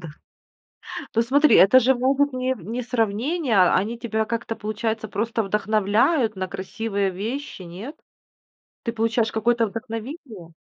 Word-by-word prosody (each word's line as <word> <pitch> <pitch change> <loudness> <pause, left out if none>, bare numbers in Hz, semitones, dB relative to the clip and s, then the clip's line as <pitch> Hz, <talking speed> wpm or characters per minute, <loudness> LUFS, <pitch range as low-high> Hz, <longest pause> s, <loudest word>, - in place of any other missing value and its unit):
да. 165 - -8 1.1
Ну, 230 - +3
смотри, 285 +6 +4
это 210 +7 +7
же 260 +2 +3
могут 270 +3 +1
не 255 0 -1
в - - -14
не 235 +4 -4
сравнение, 240 - 0
а 180 -1 +5
они 220 +5 -1
тебя 220 -2 -1
как-то, 230 0 -4
получается, 220 +1 -3
просто 225 +3 -1
вдохновляют 215 - +1
на 185 0 -3
красивые 200 +1 -2
вещи, 220 +5 -5
нет? 185 - -8 0.9
Ты 230 - -2
получаешь 225 0 0
какое-то 230 +1 +1
вдохновение? 225 - -7
225 Hz, 140 wpm, -23 LUFS, 210-250 Hz, 1.1 s, это